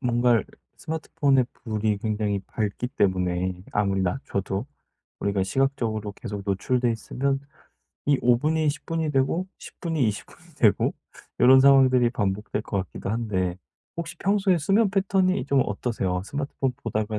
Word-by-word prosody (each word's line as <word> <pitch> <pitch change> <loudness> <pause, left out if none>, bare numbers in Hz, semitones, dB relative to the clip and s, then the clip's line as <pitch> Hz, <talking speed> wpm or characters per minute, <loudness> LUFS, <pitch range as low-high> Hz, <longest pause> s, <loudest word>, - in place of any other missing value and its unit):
뭔가를 120 -3 +2 0.3
스마트폰의 145 -5 0
불이 110 -2 -2
굉장히 105 -2 -1
밝기 110 +3 -3
때문에 90 -3 0
아무리 100 -2 +1
낮춰도 100 0 -2 0.5
우리가 100 -1 0
시각적으로 110 -3 -1
계속 105 -2 -6
노출돼 120 +5 +1
있으면 135 +4 -1 0.7
이 145 -2 +3
5 120 0 +5
분이 155 +2 +1
10 150 - -9
분이 165 -2 -1
되고 135 +7 +1
10 - - -12
분이 160 -8 0
20 100 - -4
분이 - - -20
되고 - - +3 0.5
요런 130 +2 +8
상황들이 130 -3 +5
반복될 105 -1 -2
것 100 - -2
같기도 95 - -6
한데 95 -6 -1 0.4
혹시 170 0 -5
평소에 195 -2 +2
수면 195 +6 +2
패턴이 190 -1 +1
좀 140 -2 +3
어떠세요? 100 -4 -2
스마트폰 140 0 -2
보다가 110 -1 -2
120 Hz, 315 characters per minute, -25 LUFS, 100-140 Hz, 0.7 s, 요런